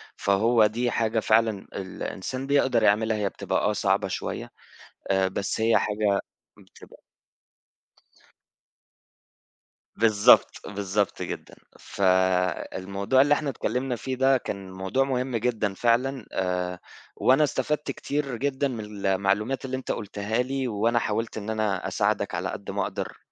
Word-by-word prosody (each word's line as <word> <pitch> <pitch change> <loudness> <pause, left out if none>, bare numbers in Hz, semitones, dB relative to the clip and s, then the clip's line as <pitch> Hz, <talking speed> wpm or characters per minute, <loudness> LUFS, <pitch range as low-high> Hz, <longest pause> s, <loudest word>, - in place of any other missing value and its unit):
فهو 110 +3 +3
دي 120 +3 0
حاجة 115 0 +1
فعلًا 110 -2 +2
الإنسان 100 +7 -5
بيقدَر 140 -5 +3
يعملها، 110 +1 +3
هي 105 -2 0
بتبقى - - -2
آه - - +1
صعبة - - +1
شوية - - -4 0.6
آآ، 95 0 +3
بس 100 +3 -3
هي 115 +1 +4
حاجة 105 -1 +1 0.4
بتبقى - - -17 3.0
بالضبط، 110 -2 +5 0.2
بالضبط، 100 0 -1
جدًا، - - -6 0.2
فالموضوع 95 +4 +1
اللي 145 +1 +4
إحنا 150 -1 0
اتكلّمنا 125 +1 -2
في 130 +3 -4
ده 135 +1 +4
كان 95 -5 -6
موضوع 95 +8 0
مهم 130 -2 -2
جدًا 110 -3 0
فعلًا 120 +3 +1
آآ 90 -1 -2 0.4
وأنا 135 +4 +4
استفدت 150 +1 -1
كتير 140 -3 -3
جدًا 140 +1 0
من 105 -5 -6
المعلومات 100 +7 +1
اللي 130 0 -3
أنت 130 - -4
قُلتها 105 +1 -3
لي 135 0 -2
وأنا 115 +2 +1
حاولت 110 +1 -2
إن 110 +1 -5
أنا 105 -4 -1
أساعدك - - 0
على - - -2
قد - - -6
ما - - -1
أقدر - - -5
110 Hz, 130 wpm, -26 LUFS, 100-130 Hz, 3.0 s, بالضبط